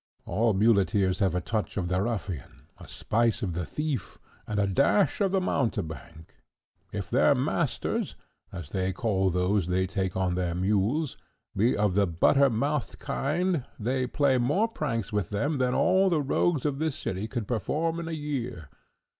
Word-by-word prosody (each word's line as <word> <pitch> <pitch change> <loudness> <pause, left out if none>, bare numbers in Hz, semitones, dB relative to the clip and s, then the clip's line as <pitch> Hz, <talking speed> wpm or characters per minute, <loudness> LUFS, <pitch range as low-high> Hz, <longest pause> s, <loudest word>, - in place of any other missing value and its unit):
All 110 +3 +1
muleteers 100 -3 +3
have 95 -3 +2
a 90 - 0
touch 110 +1 -3
of 90 -3 -1
the 90 +1 0
ruffian, 95 - -4
a - - -11
spice 115 +1 0
of 90 -4 -1
the 85 0 -3
thief, 150 -3 -3 0.3
and 105 -1 -1
a 100 - +3
dash 140 - +2
of 195 -2 +2
the 190 - +2
mountebank. 80 - -3 0.6
If - - -5
their - - +4
masters, - - -1 0.4
as 85 -6 -7
they 95 +1 -1
call 95 -2 +1
those 90 +1 +1
they 90 +1 +1
take 95 -1 -2
on 95 -1 +1
their 90 -1 -1
mules, 105 - 0 0.4
be 115 +6 +2
of 105 -2 +2
the 100 +1 +3
butter 135 - +4
mouthed 140 +4 -1
kind, 170 +2 -1 0.2
they 125 +3 0
play 135 0 +2
more 165 - +2
pranks 115 - -3
with 105 -4 -1
them 140 +8 -1
than 125 -1 +1
all 190 +1 +4
the 160 -4 +1
rogues 145 +2 +1
of 140 -2 -1
this 155 -2 -1
city 95 -3 -3
could 115 -3 -4
perform 155 - -1
in 170 - -5
a - - -4
year. 125 - -4
110 Hz, 170 wpm, -27 LUFS, 95-140 Hz, 0.6 s, their